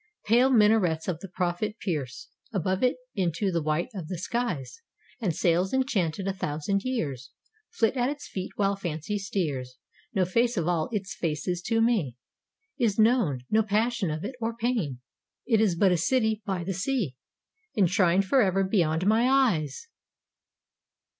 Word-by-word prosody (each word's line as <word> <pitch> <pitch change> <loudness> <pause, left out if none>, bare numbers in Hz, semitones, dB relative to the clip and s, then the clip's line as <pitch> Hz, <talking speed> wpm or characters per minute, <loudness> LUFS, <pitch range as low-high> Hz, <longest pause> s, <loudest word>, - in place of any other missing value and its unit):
Pale 240 +5 +4
minarets 210 -8 +3
of 175 -4 -2
the 195 - -8
Prophet 185 +4 -2
pierce 150 - -4 0.2
Above 190 -2 -1
it 250 0 +3 0.2
into 190 0 0
the 170 -2 0
white 155 +5 -1
of 180 -6 -6
the 180 +1 -4
skies, 165 - -3 0.4
And 190 -9 -1
sails 180 +4 +1
enchanted 195 - 0
a 195 - 0
thousand 190 +2 -2
years 145 - -3 0.4
Flit 235 -9 +1
at 250 0 +1
its 290 0 -6
feet 185 -1 -5
while 200 -1 +1
fancy 175 +2 -3
steers. 145 -10 -3 0.3
No 190 -6 +1
face 235 +5 +1
of 170 -2 0
all 170 -3 0
its 195 -3 -3
faces 170 +2 -2
to 225 0 +2
me 200 - +1 0.6
Is 225 -5 +1
known 220 - +3
no 220 +1 +5
passion 220 -1 0
of 155 +1 -3
it 255 - -4
or 225 0 -2
pain. 220 - -1 0.4
It 225 -3 +3
is 200 -6 +2
but 190 +2 +4
a 180 - +3
city 220 +3 +1
by 190 -3 -1
the 190 +3 -2
sea, 195 - -1 0.6
Enshrined 190 -1 +3
forever 195 -4 +3
beyond 175 -4 +1
my 225 +4 +4
eyes! 235 - +1
195 Hz, 160 wpm, -27 LUFS, 165-225 Hz, 0.6 s, no